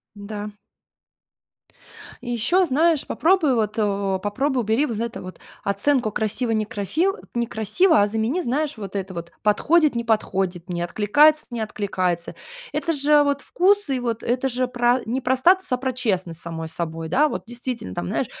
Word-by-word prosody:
Да. 205 Hz, +1 st, -6 dB, 1.7 s
И 245 Hz, -, -5 dB
ещё 295 Hz, -, +2 dB
знаешь 315 Hz, +1 st, +2 dB
попробуй 330 Hz, -5 st, +2 dB
вот, 215 Hz, -2 st, -1 dB
о, 200 Hz, -2 st, 0 dB
попробуй 255 Hz, +5 st, 0 dB
убери 225 Hz, +8 st, +1 dB
вот 225 Hz, -5 st, -4 dB
это 235 Hz, 0 st, -4 dB
вот: 185 Hz, 0 st, -9 dB, 0.3 s
оценку 215 Hz, +4 st, +1 dB
красиво-некрафи 220 Hz, -, -1 dB, 0.3 s
некрасиво. 240 Hz, -, +2 dB
А -, -, +3 dB
замени, 225 Hz, -, -1 dB
знаешь, 290 Hz, +3 st, -1 dB
вот 200 Hz, -2 st, -6 dB
это 190 Hz, -1 st, -4 dB
вот: 170 Hz, 0 st, -7 dB
подходит-не 280 Hz, +3 st, +3 dB
подходит, 190 Hz, -5 st, -1 dB
мне 175 Hz, -1 st, -2 dB
откликается-не 245 Hz, -, +3 dB
откликается. 185 Hz, -5 st, -2 dB, 0.4 s
Это 335 Hz, -, -1 dB
же 295 Hz, 0 st, +4 dB
вот 285 Hz, -1 st, 0 dB
вкусы, 370 Hz, -3 st, +2 dB
и -, -, -3 dB
вот 235 Hz, -2 st, -3 dB
это 250 Hz, +3 st, 0 dB
же 255 Hz, 0 st, 0 dB
про 245 Hz, 0 st, +2 dB
не 245 Hz, +4 st, -1 dB
про 260 Hz, 0 st, +1 dB
статус, 370 Hz, +8 st, +3 dB
а -, -, +4 dB
про 260 Hz, +1 st, -2 dB
честность 185 Hz, -9 st, -1 dB
с -, -, -7 dB
самой 165 Hz, -1 st, -5 dB
собой, 165 Hz, 0 st, -4 dB
да, 295 Hz, -, +3 dB
вот. -, -, -5 dB
Действительно, 240 Hz, -, -5 dB
там, 90 Hz, -, -3 dB
знаешь, -, -, -1 dB
235 Hz, 160 wpm, -23 LUFS, 200-280 Hz, 1.7 s, же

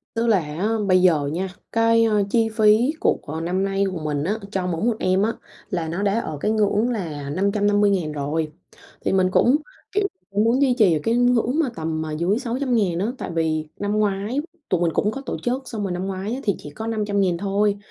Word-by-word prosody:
Tức 230 Hz, +1 st, 0 dB
là 215 Hz, -4 st, +4 dB
á, 160 Hz, +6 st, -3 dB, 0.2 s
bây 185 Hz, -1 st, +5 dB
giờ 160 Hz, -6 st, +3 dB
nha, 185 Hz, +3 st, -1 dB, 0.2 s
cái, 230 Hz, 0 st, +4 dB
a, 220 Hz, -, +1 dB, 0.2 s
chi 225 Hz, 0 st, +2 dB
phí 220 Hz, +6 st, +4 dB
của -, -, +2 dB
của 160 Hz, +2 st, -5 dB
năm 180 Hz, +3 st, -1 dB
nay 195 Hz, 0 st, 0 dB
của 180 Hz, -, -4 dB
mình 145 Hz, -2 st, -1 dB
á, 205 Hz, +7 st, -1 dB
cho 190 Hz, -3 st, -1 dB
mỗi 170 Hz, 0 st, -2 dB
một 235 Hz, -2 st, +2 dB
em 185 Hz, +1 st, +2 dB
á, 220 Hz, +3 st, +2 dB, 0.4 s
là 170 Hz, -4 st, -2 dB
nó 170 Hz, +4 st, -3 dB
đã 205 Hz, +2 st, +2 dB
ở 155 Hz, -9 st, -4 dB
cái 210 Hz, -, +1 dB
ngưỡng 215 Hz, +1 st, +2 dB
là 160 Hz, -, -4 dB
550.000 200 Hz, -1 st, +2 dB
rồi. 150 Hz, +2 st, -2 dB, 0.5 s
Thì -, -, 0 dB
mình 185 Hz, -1 st, +3 dB
cũng, 245 Hz, +7 st, +4 dB, 0.4 s
kiểu, 405 Hz, 0 st, +1 dB, 0.2 s
cũng 205 Hz, +1 st, +1 dB
muốn 235 Hz, +4 st, +2 dB
duy 265 Hz, -3 st, +4 dB
trì 215 Hz, -8 st, +4 dB
ở -, -, 0 dB
cái 230 Hz, -, +1 dB
ngưỡng 245 Hz, +3 st, +2 dB
mà 305 Hz, -5 st, +2 dB
tầm 160 Hz, -2 st, -3 dB
mà 160 Hz, -1 st, -4 dB
dưới 175 Hz, +8 st, 0 dB
600.000 235 Hz, -8 st, 0 dB
á. 200 Hz, -, 0 dB
Tại -, -, -5 dB
vì 160 Hz, -1 st, 0 dB
năm 205 Hz, +1 st, 0 dB
ngoái 205 Hz, +5 st, 0 dB, 0.3 s
tụi 180 Hz, -2 st, +1 dB
mình 170 Hz, -, +2 dB
cũng 210 Hz, -, +1 dB
có 270 Hz, -, -6 dB
tổ -, -, -3 dB
chức, 250 Hz, +2 st, 0 dB
xong 220 Hz, -4 st, -4 dB
rồi 195 Hz, -, -2 dB
năm 180 Hz, +1 st, -3 dB
ngoái 195 Hz, +3 st, -3 dB
á, 260 Hz, -, -3 dB
thì 200 Hz, -, +1 dB
chỉ -, -, -9 dB
có 220 Hz, +10 st, -7 dB
500.000 200 Hz, -5 st, 0 dB
thôi. 200 Hz, +1 st, +1 dB
200 Hz, 230 wpm, -22 LUFS, 170-225 Hz, 0.5 s, bây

